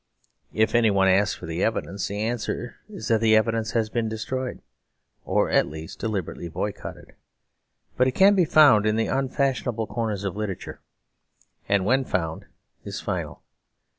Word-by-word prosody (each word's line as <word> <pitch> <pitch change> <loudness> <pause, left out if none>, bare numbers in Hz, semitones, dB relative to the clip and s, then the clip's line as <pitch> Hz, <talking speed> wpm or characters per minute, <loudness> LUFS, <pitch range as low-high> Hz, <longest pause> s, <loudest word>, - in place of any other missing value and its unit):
If 110 0 +2
anyone 105 -5 +4
asks 100 +2 +3
for - - -10
the 80 +2 -2
evidence, 100 -3 -1
the 100 +1 -4
answer 120 +1 -3
is 205 - -7
that 115 -1 +3
the 110 -1 +5
evidence 115 0 +1
has 110 -2 0
been 115 -2 -1
destroyed, 130 +4 -4 0.6
or - - +1
at - - +3
least 80 +1 -9
deliberately 95 -5 -3
boycotted: 80 - -6 0.8
but 130 +1 +3
can 195 +1 +6
be 185 -4 +3
found 140 -10 +6
in 110 - +2
the 115 - +1
unfashionable 130 -4 -1
corners 110 -4 -3
of 100 -2 -3
literature; 105 -3 -5 0.9
and, 100 -2 +2
when 130 +5 +3
found, 80 -9 -3 0.4
is - - -5
final. - - -4
110 Hz, 150 wpm, -25 LUFS, 100-120 Hz, 0.9 s, can